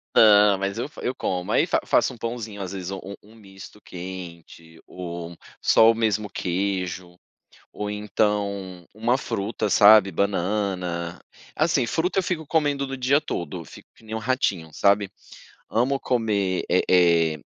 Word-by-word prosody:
Não, 105 -2 +6
mas 100 +2 -3
eu 125 +5 -3
fa - - -12
eu 125 - -1
como 90 -7 -3
aí - - +3
fa - - +1
faço - - +2
um - - -13
pãozinho, 115 -3 -5
às 95 -2 -5
vezes 95 -1 -5
u 95 - -5
um 100 +1 -8 0.2
um - - -18
misto 100 -1 -14
quente 85 -3 -10
ou 85 -1 -7 0.2
só 115 0 +6
o - - -3
mesmo 110 -2 0
queijo 90 -1 -3 0.6
ou 105 0 -4
então 100 -3 -2
uma 115 +4 +1
fruta, 105 -3 -3
sabe, 105 -1 +7
banana, 90 -3 -2 0.4
assim, 150 -5 +2
fruta, 170 +9 -1
eu - - +3
fico 165 -3 -3
comendo 145 -3 0
no 135 0 -5
dia 130 +3 +3
todo, 85 - -5
fico - - -15
que - - -22
nem 110 0 -7
um - - -1
ratinho, 105 - -1
sabe. 100 +1 +2 0.6
Amo 130 +5 +1
comer, 105 -7 0
eh 90 - +3
eh 85 -3 +4
100 Hz, 160 wpm, -24 LUFS, 90-115 Hz, 0.6 s, sabe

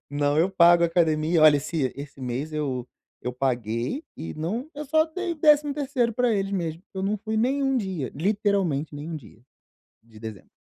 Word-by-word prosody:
Não, 145 +1 +1
eu 175 +4 +3
pago 170 -2 +6
academia, 165 -1 +2
olha 150 -2 +7
se 140 -3 -2
esse 140 -1 -9
mês 130 +5 -3
eu 135 -5 -2 0.4
eu 125 - -3
paguei 125 - -2
e 80 0 -6
não 220 - -3
eu 300 +1 -5
só 315 +3 +3
dei 345 +2 -4
o - - -4
13º 290 -5 +2
para 245 +1 +2
eles 195 -1 -1
mesmo, 165 -3 -2
eu 190 - -3
não 205 +2 0
fui 220 +1 -3
nenhum 270 +4 +1
dia, 190 - -3
literalmente 190 -4 0
nenhum 155 +3 -5
dia, 115 -5 -14 0.6
de 110 -2 -16
dezembro. 110 -3 -9
170 Hz, 175 wpm, -25 LUFS, 140-230 Hz, 0.6 s, olha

